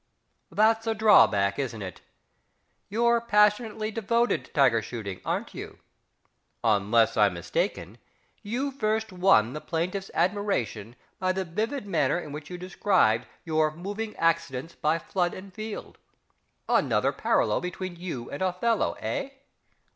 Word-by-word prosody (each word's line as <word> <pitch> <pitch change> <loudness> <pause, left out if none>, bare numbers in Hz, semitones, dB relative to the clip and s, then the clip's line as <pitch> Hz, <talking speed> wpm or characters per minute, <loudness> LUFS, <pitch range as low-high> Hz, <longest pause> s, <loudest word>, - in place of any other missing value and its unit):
That's 225 +1 +3
a 225 - +1
drawback, 100 - +5
isn't 120 -6 -3
it? 95 - -8 0.9
You're 235 +2 +2
passionately 215 0 +2
devoted 230 +2 +1
to - - -20
tiger 130 -6 +4
shooting, 110 -5 -6
aren't - - -3
you? - - -8 0.9
Unless 110 +1 +3
I'm 105 -4 +4
mistaken, 85 +4 -3 0.4
you 245 +7 -2
first 220 -4 -1
won 180 - +4
the 150 - -5
plaintiff's 180 +4 -3
admiration 130 - -1 0.2
by 185 0 +1
the 190 0 -2
vivid 220 +9 -3
manner 195 -3 +1
in 155 -4 -8
which 150 +1 -8
you 180 - -6
described 175 - +2 0.2
your 155 -2 +2
"moving 205 +5 -5
accidents 165 -3 0
by 155 0 +1
flood 175 +1 -1
and 190 0 -10
field" 215 +1 -7 0.7
another - - +2
parallel - - +1
between 180 0 -5
you 170 -9 -6
and 140 - -6
OTHELLO, 190 +5 +1
eh? 275 - -2
180 Hz, 130 wpm, -27 LUFS, 130-215 Hz, 0.9 s, drawback